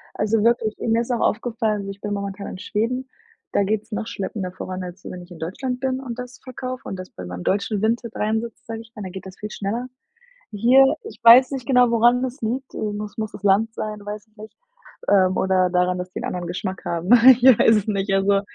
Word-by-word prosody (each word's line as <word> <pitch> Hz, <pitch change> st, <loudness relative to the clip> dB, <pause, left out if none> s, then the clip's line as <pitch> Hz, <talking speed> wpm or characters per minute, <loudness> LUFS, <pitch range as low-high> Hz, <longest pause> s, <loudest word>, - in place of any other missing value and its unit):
Also 215 Hz, 0 st, +1 dB
wirklich, 230 Hz, -2 st, +2 dB
mir 230 Hz, 0 st, +1 dB
ist 240 Hz, -, -4 dB
auch 240 Hz, -, 0 dB
aufgefallen, 220 Hz, -2 st, 0 dB
also 195 Hz, 0 st, -5 dB
ich 195 Hz, -, -13 dB
bin 205 Hz, 0 st, -3 dB
momentan 200 Hz, 0 st, -5 dB
in -, -, -7 dB
Schweden, 230 Hz, +6 st, -2 dB, 0.4 s
da 200 Hz, -, +2 dB
geht's 215 Hz, +2 st, -2 dB
noch 220 Hz, +1 st, -3 dB
schleppender 190 Hz, -2 st, -4 dB
voran, 185 Hz, 0 st, -6 dB
als 180 Hz, +1 st, -9 dB
wenn 180 Hz, -1 st, -7 dB
ich 175 Hz, -, -14 dB
in 170 Hz, -, -10 dB
Deutschland 250 Hz, +10 st, -4 dB
bin 260 Hz, 0 st, -1 dB
und 250 Hz, -3 st, -6 dB
das 250 Hz, 0 st, -8 dB
verkaufe 255 Hz, 0 st, -6 dB
und 195 Hz, -, -4 dB
das 185 Hz, 0 st, -9 dB
bei 90 Hz, -, -9 dB
meinem 90 Hz, 0 st, -7 dB
deutschen 200 Hz, +1 st, 0 dB
Vinted 230 Hz, +1 st, -1 dB
reinsetze, 220 Hz, +2 st, -2 dB
sage 225 Hz, 0 st, -6 dB
ich 225 Hz, 0 st, -17 dB
mal, 210 Hz, -, -7 dB
da 185 Hz, -, -5 dB
geht 190 Hz, +1 st, -9 dB
das 185 Hz, -, -12 dB
viel 210 Hz, 0 st, -7 dB
schneller. 225 Hz, +5 st, -3 dB, 0.7 s
Hier, 245 Hz, +6 st, +5 dB, 0.2 s
ich 440 Hz, -, -10 dB
weiß 250 Hz, +4 st, +8 dB
nicht 260 Hz, -3 st, -4 dB
genau, 250 Hz, -3 st, +4 dB
woran 240 Hz, +2 st, +4 dB
das 260 Hz, +2 st, -4 dB
liegt. 255 Hz, +4 st, -3 dB
Äh, -, -, -8 dB, 0.2 s
muss 210 Hz, 0 st, -6 dB
muss 215 Hz, -1 st, -4 dB
das 205 Hz, -, -11 dB
Land 205 Hz, +3 st, +3 dB
sein, 215 Hz, -2 st, -5 dB
weiß 210 Hz, +1 st, -7 dB
ich 215 Hz, -, -37 dB
nicht. 215 Hz, +1 st, -11 dB, 0.6 s
Ähm, 185 Hz, -2 st, +4 dB
oder 185 Hz, -1 st, +2 dB
daran, 180 Hz, 0 st, +1 dB
dass 180 Hz, 0 st, -5 dB
die -, -, -5 dB
'n -, -, -7 dB
anderen 175 Hz, -1 st, -4 dB
Geschmack 185 Hz, +2 st, -5 dB
haben. 170 Hz, +1 st, -3 dB, 0.3 s
Ich -, -, -19 dB
weiß 240 Hz, -3 st, +7 dB
es 210 Hz, -, -1 dB
nicht. 195 Hz, -1 st, -1 dB
Also, 195 Hz, +1 st, +3 dB
215 Hz, 235 wpm, -22 LUFS, 195-235 Hz, 0.7 s, weiß